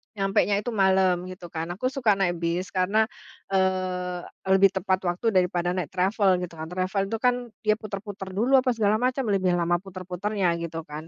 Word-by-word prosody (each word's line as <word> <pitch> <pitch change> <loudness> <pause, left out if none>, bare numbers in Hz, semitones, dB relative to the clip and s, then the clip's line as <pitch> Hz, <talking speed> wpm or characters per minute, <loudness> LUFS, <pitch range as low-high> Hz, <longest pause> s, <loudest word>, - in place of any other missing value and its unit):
nyampenya 200 0 +2
itu 225 +2 -4
malam, 190 -2 +3
gitu 185 -1 -9
kan. 165 0 -4
Aku 200 +9 -2
suka 240 -7 +1
naik 175 -2 +1
bis 170 +2 -2
karena, 200 +4 +2 0.4
eee, 185 -1 0 0.3
lebih 195 +1 +7
tepat 190 0 +1
waktu 180 +6 0
daripada 180 -2 +1
naik 180 -3 -2
travel, 190 +3 +2
gitu 180 - -6
kan. 160 - -5
Travel 185 +3 -1
itu 225 - -2
kan, 250 +2 +2 0.3
dia 215 -1 +3
putar-putar 200 -1 -7
dulu, 255 +6 +4
apa 255 -1 0
segala 215 -1 +2
macam, 255 +2 0
lebih 185 -2 +2
lama 175 0 +1
putar-putarnya, 185 +1 -2
gitu 165 -1 -5
kan. 155 +1 -8
190 Hz, 180 wpm, -25 LUFS, 180-210 Hz, 0.4 s, lebih